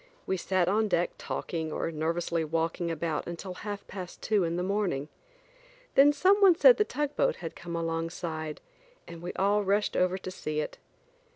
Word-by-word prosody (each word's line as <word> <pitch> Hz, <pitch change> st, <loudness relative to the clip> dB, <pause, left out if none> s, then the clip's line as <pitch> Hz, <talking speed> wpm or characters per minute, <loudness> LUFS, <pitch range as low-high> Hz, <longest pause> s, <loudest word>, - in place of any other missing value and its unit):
We 190 Hz, -, 0 dB
sat 185 Hz, -1 st, +1 dB
on 215 Hz, +3 st, +2 dB
deck 175 Hz, -3 st, +1 dB
talking 160 Hz, -2 st, -3 dB
or 165 Hz, -, -2 dB
nervously 165 Hz, +1 st, -1 dB
walking 165 Hz, +2 st, -1 dB
about 165 Hz, -1 st, -2 dB
until 175 Hz, +2 st, -6 dB
half 205 Hz, +2 st, -6 dB
past 185 Hz, -3 st, -8 dB
two 210 Hz, -3 st, +1 dB
in 165 Hz, 0 st, -1 dB
the 180 Hz, -, -1 dB
morning. 185 Hz, -8 st, -1 dB, 0.8 s
Then 280 Hz, +2 st, +7 dB
some 385 Hz, +7 st, +3 dB
one 380 Hz, -3 st, +8 dB
said -, -, +7 dB
the 425 Hz, -, +4 dB
tugboat 295 Hz, -5 st, 0 dB
had 165 Hz, -2 st, -7 dB
come 170 Hz, 0 st, -6 dB
alongside, 165 Hz, -1 st, -3 dB, 0.5 s
and 170 Hz, -1 st, -9 dB
we 175 Hz, -, -4 dB
all 205 Hz, +2 st, +2 dB
rushed 200 Hz, +2 st, +1 dB
over 185 Hz, +1 st, +2 dB
to 185 Hz, -1 st, -7 dB
see 155 Hz, -4 st, -3 dB
it. 150 Hz, -, -4 dB
175 Hz, 175 wpm, -29 LUFS, 165-205 Hz, 0.8 s, one